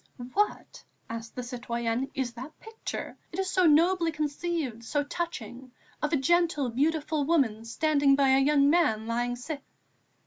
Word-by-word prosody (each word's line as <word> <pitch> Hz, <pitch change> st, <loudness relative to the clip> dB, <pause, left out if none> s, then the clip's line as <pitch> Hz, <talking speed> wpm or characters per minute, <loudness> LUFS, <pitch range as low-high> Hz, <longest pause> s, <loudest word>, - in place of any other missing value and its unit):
"What," 415 Hz, +1 st, -1 dB, 0.3 s
asked 230 Hz, 0 st, -7 dB
the 250 Hz, -, -4 dB
citoyenne, 240 Hz, 0 st, -2 dB
"is 255 Hz, -3 st, -2 dB
that 260 Hz, +6 st, -10 dB
picture 445 Hz, 0 st, -6 dB, 0.2 s
it -, -, -7 dB
is 385 Hz, -1 st, -1 dB
so 370 Hz, -2 st, +4 dB
nobly 335 Hz, +2 st, +4 dB
conceived, 300 Hz, -5 st, -3 dB
so 290 Hz, +5 st, 0 dB
touching 265 Hz, -6 st, -5 dB, 0.3 s
of 300 Hz, -, 0 dB
a 310 Hz, -, +3 dB
gentle, 325 Hz, -1 st, +2 dB
beautiful 300 Hz, +3 st, 0 dB
woman 265 Hz, -8 st, +1 dB
standing 285 Hz, +3 st, +3 dB
by 275 Hz, -1 st, +3 dB
a 265 Hz, 0 st, +5 dB
young 280 Hz, 0 st, +4 dB
man 290 Hz, -9 st, +3 dB
lying 240 Hz, +1 st, -1 dB
sick?" 280 Hz, +4 st, -6 dB
280 Hz, 150 wpm, -28 LUFS, 245-325 Hz, 0.3 s, a